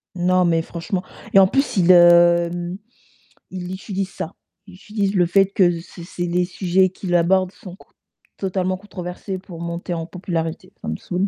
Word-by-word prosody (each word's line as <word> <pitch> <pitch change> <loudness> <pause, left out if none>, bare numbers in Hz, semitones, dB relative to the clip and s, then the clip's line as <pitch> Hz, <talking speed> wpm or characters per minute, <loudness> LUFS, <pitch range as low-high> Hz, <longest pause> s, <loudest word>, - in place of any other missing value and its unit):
Non, 180 0 +2
mais 165 -1 +2
franchement, 170 +3 -4 0.3
et 195 - +8
en 190 - +7
plus, 270 +4 0
il, 180 -1 +3
hem, 175 0 +5 0.7
il 180 -1 -6
utilise 195 0 -4
ça. 165 - -6 0.3
Il 185 - -13
utilise 205 +1 -2
le 180 -2 +4
fait 195 +3 +3
que 180 -4 +2
c'est 170 0 -12
c'est 175 +1 -5
les 175 +1 +1
sujets 185 +1 +1
qu'il 180 -1 -3
abordent 185 +2 +3
sont 185 -2 -12
c - - -20 0.5
totalement 185 -1 -1
controversés 185 -1 -6
pour 175 -3 -11
monter 170 +1 -4
en 165 -1 -3
popularité. 165 -2 -4
Ça - - -7
me 80 - -3
saoule. 185 +2 -2
180 Hz, 175 wpm, -21 LUFS, 175-190 Hz, 0.7 s, et